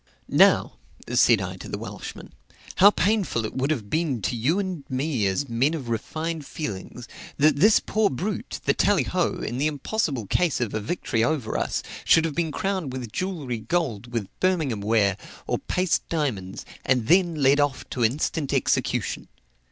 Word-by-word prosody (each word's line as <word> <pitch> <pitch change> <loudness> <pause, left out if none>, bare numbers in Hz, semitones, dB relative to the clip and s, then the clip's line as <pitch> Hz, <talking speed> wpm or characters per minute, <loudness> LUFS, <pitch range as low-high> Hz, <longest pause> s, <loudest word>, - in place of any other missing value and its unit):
"Now," - - +4 0.4
said - - +5
I - - -5
to - - -9
the - - -3
Welshman, - - -8 0.4
"How 200 +2 +9
painful 200 - 0
it - - -5
would 135 +2 0
have 125 -10 -1
been 155 -6 0
to 120 - -1
you 130 - +1
and 185 -7 -3
me 130 -5 0
as 95 +9 -1
men 130 +7 +1
of 135 -7 -6
refined 155 +8 -3
feelings, 125 -3 -6 0.3
that 145 0 +4
this 210 +8 +6
poor 215 -1 +1
brute, 190 +10 -4
the - - +3
Tallyho, - - +1
in 120 - -3
the 150 - +2
impossible 145 - -2
case 170 - +1
of 120 -4 -2
a 110 - -1
victory 115 -1 -1
over 125 -3 -1
us, - - -1 0.2
should 160 - +5
have 160 - -2
been 165 0 -1
crowned 190 -5 -2
with 125 -4 -6
jewellery, 155 - -3
gold, 120 -3 -2
with 115 -4 -2
Birmingham 160 - +1
ware, 100 -2 +2 0.3
or - - -1
paste 180 -3 -1
diamonds, 115 - -2 0.2
and 125 -3 +1
then 175 +3 +4
led 140 -1 +4
off 145 -2 0
to 125 - -1
instant 140 +4 0
execution." - - 0
140 Hz, 170 wpm, -25 LUFS, 115-165 Hz, 0.4 s, How